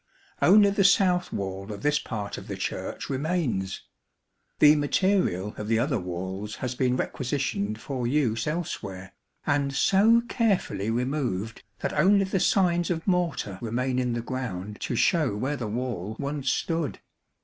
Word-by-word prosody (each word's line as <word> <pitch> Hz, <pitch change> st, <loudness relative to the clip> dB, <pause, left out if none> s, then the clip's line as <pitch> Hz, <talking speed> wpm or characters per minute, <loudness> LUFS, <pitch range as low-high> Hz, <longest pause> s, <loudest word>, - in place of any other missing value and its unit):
Only 200 Hz, +2 st, +6 dB
the 200 Hz, 0 st, +2 dB
south 185 Hz, -2 st, +4 dB
wall 95 Hz, +1 st, -4 dB
of 100 Hz, -1 st, -7 dB
this 150 Hz, 0 st, +3 dB
part 105 Hz, -4 st, -5 dB
of -, -, -12 dB
the -, -, -4 dB
Church -, -, -4 dB
remains. 135 Hz, -, -1 dB, 0.7 s
The 150 Hz, 0 st, +7 dB
material 145 Hz, -, +1 dB
of 105 Hz, -, -4 dB
the 115 Hz, 0 st, +2 dB
other 125 Hz, +1 st, +1 dB
walls 95 Hz, +4 st, -5 dB
has 130 Hz, -1 st, -3 dB
been 125 Hz, 0 st, +1 dB
requisitioned 120 Hz, -7 st, -2 dB
for 125 Hz, -1 st, -3 dB
use 120 Hz, -4 st, +1 dB
elsewhere, 95 Hz, -, -4 dB, 0.3 s
and 140 Hz, -1 st, +1 dB
so 220 Hz, +9 st, +5 dB
carefully 210 Hz, -, 0 dB
removed 120 Hz, -4 st, -2 dB, 0.2 s
that -, -, -2 dB
only 200 Hz, +1 st, +4 dB
the 190 Hz, 0 st, -1 dB
signs 175 Hz, -2 st, +2 dB
of 165 Hz, -2 st, -2 dB
mortar 170 Hz, -, 0 dB
remain 125 Hz, +3 st, -1 dB
in 125 Hz, -1 st, 0 dB
the 120 Hz, -1 st, -3 dB
ground 105 Hz, -6 st, -5 dB
to 120 Hz, -, -2 dB
show 150 Hz, -, +2 dB
where 135 Hz, +8 st, -1 dB
the 120 Hz, -6 st, -4 dB
wall 110 Hz, -3 st, -3 dB
once 140 Hz, -1 st, -2 dB
stood. 165 Hz, -3 st, -1 dB
130 Hz, 150 wpm, -26 LUFS, 105-165 Hz, 0.7 s, The